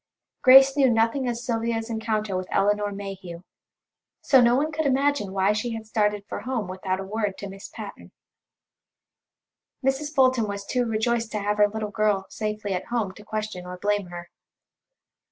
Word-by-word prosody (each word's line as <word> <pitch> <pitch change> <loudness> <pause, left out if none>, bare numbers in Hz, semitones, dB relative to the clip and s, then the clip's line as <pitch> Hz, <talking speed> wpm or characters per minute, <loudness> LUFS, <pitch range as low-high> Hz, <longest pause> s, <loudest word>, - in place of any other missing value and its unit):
Grace 270 +1 +8
knew 275 -3 +4
nothing 230 +3 +1
of 235 - -2
Sylvia's 230 -1 -2
encounter 220 -3 -2
with 185 0 -3
Elinor 205 +1 +1
Mayhew, 195 -3 -7 0.8
so 265 -3 +5
no 240 0 +5
one 300 +4 0
could 315 -1 -1
imagine 275 -6 +1
why 195 +1 +2
she 225 +2 -2
had 220 -1 -7
started 210 -2 0
for - - -5
home 230 -2 -3
without 185 0 -3
a - - -4
word 205 0 -2
to 200 - -6
Miss 195 0 -9
Patten. - - -10 1.7
Mrs. 270 +3 0
Fulton 255 -6 +3
was 200 0 -5
too 245 +1 0
rejoiced 225 +1 0
to 210 - -1
have 205 +1 -1
her 210 0 +5
little 215 0 -4
girl 205 -2 +1
safely 210 -2 -3
at 180 - -3
home 230 -5 -1
to 210 - -14
question 215 -4 -5
or 180 0 -7
blame 205 0 0
her. 175 0 -9
215 Hz, 170 wpm, -25 LUFS, 200-240 Hz, 1.7 s, Grace